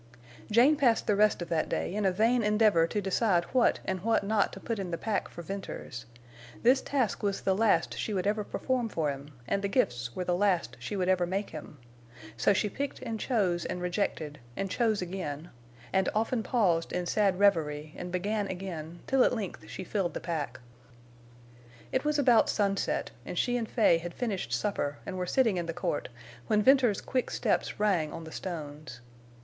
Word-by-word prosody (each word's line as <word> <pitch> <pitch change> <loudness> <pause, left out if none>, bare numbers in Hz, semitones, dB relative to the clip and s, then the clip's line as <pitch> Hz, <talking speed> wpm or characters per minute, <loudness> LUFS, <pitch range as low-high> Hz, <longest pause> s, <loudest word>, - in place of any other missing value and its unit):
Jane 245 +8 +5
passed 245 -6 +3
the 210 - +2
rest 210 -3 +3
of - - -10
that 165 -2 0
day - - -2
in 210 0 -1
a - - +3
vain 230 +6 +3
endeavor 210 -5 +4
to 210 - -2
decide 195 -2 +2
what 255 -2 +3
and 190 0 -1
what 225 +1 +2
not 205 0 +1
to - - -8
put 225 +1 -3
in 190 -2 -3
the 170 - -2
pack 210 +4 -1
for 170 - -9
Venters. 170 -10 -6 0.6
This 255 +3 +5
task 260 -7 -1
was 200 -1 -1
the 190 - +1
last 200 -5 +2
she - - -2
would 190 -2 -1
ever 210 +1 +1
perform 250 +2 -1
for 155 -7 0
him, 140 +1 -8 0.2
and 200 - 0
the 200 - 0
gifts 120 - 0
were 185 - -2
the 180 - 0
last 180 -8 +1
she 125 +11 -5
would 185 -2 0
ever 185 -2 +2
make 195 +3 -2
him. 155 -1 -9 0.6
So 115 - +3
she 205 +1 +2
picked 275 +7 -4
and 225 -2 -4
chose 190 -10 +1
and 180 - -4
rejected, 175 -5 -2 0.2
and 195 -1 -2
chose 220 -5 +1
again, 170 -3 -5 0.4
and 190 0 +3
often 225 +2 +1
paused 185 -9 +1
in 180 0 -2
sad 195 0 +2
revery, 155 -6 +2
and 180 0 -6
began 205 +3 -1
again, 175 -3 -6
till 265 -1 +4
at - - +2
length 205 -5 -5
she - - -6
filled 190 -2 -2
the - - -2
pack. 150 -6 -4 1.3
It 260 - 0
was 300 0 +1
about 245 -5 +5
sunset, 200 -2 0
and - - -6
she 245 - +1
and 230 -3 -2
Fay 210 -8 +4
had 175 0 -7
finished 215 -7 -3
supper 145 -9 -1
and 190 - -5
were 180 - -2
sitting 225 -6 +2
in 170 -1 -2
the 165 - -2
court, 170 -3 -2 0.4
when 210 -1 +3
Venters's 255 -6 +4
quick 255 -2 -1
steps - - -1
rang 185 -8 +2
on 165 - -7
the 160 - -9
stones. 150 -8 -6
195 Hz, 200 wpm, -29 LUFS, 170-220 Hz, 1.3 s, Jane